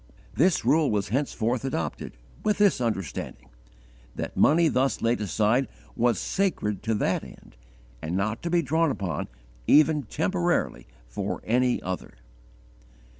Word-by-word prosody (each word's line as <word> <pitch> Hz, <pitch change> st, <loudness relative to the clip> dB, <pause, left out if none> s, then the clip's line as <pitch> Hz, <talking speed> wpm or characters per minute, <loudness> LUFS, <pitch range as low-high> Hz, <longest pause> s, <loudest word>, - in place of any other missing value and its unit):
This 175 Hz, +2 st, +2 dB
rule 155 Hz, -1 st, +4 dB
was 100 Hz, -1 st, -1 dB
henceforth 120 Hz, -1 st, -1 dB
adopted, 80 Hz, -, -4 dB, 0.3 s
with 210 Hz, -1 st, +1 dB
this 200 Hz, -10 st, +3 dB
understanding, 100 Hz, -, -4 dB, 0.7 s
that -, -, -5 dB
money 165 Hz, +3 st, +5 dB
thus 130 Hz, -5 st, 0 dB
laid 115 Hz, 0 st, +1 dB
aside 110 Hz, +6 st, +1 dB, 0.3 s
was 120 Hz, -1 st, +2 dB
sacred 175 Hz, -, -1 dB
to 110 Hz, 0 st, 0 dB
that -, -, 0 dB
end, -, -, -14 dB, 0.5 s
and 85 Hz, +3 st, -2 dB
not 110 Hz, +3 st, -1 dB
to 170 Hz, -, -3 dB
be 170 Hz, 0 st, +2 dB
drawn 160 Hz, +4 st, +2 dB
upon, 95 Hz, -, -3 dB, 0.4 s
even 155 Hz, 0 st, +5 dB
temporarily, 175 Hz, -, -1 dB, 0.2 s
for -, -, -4 dB
any 125 Hz, +2 st, +2 dB
other. 95 Hz, 0 st, -5 dB
125 Hz, 130 wpm, -26 LUFS, 105-160 Hz, 0.7 s, money